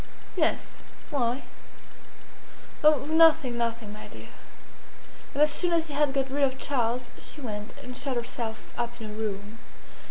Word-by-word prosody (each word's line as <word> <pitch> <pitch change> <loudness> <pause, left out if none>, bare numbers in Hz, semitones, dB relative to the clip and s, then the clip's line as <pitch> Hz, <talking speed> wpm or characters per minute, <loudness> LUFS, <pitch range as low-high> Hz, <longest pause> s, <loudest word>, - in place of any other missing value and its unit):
"Yes. - - +1 0.3
Why?" 250 -2 0 1.4
"Oh, 300 -3 +6
nothing, 315 -5 +5
nothing, 230 -3 -2
my 210 - -9
dear!" - - -11 1.1
And 290 - +5
as 300 - +5
soon 345 +3 +2
as 330 -1 +3
she 300 - -6
had 290 0 +3
got 270 -1 0
rid 285 +1 0
of 265 -1 +2
Charles 245 -3 0
she - - -7
went 210 -5 -5
and 250 0 -7
shut 270 -1 -2
herself 230 -2 -4
up 240 0 -3
in 220 -1 -6
her - - -7
room. 210 0 -4
250 Hz, 155 wpm, -28 LUFS, 230-290 Hz, 1.4 s, Oh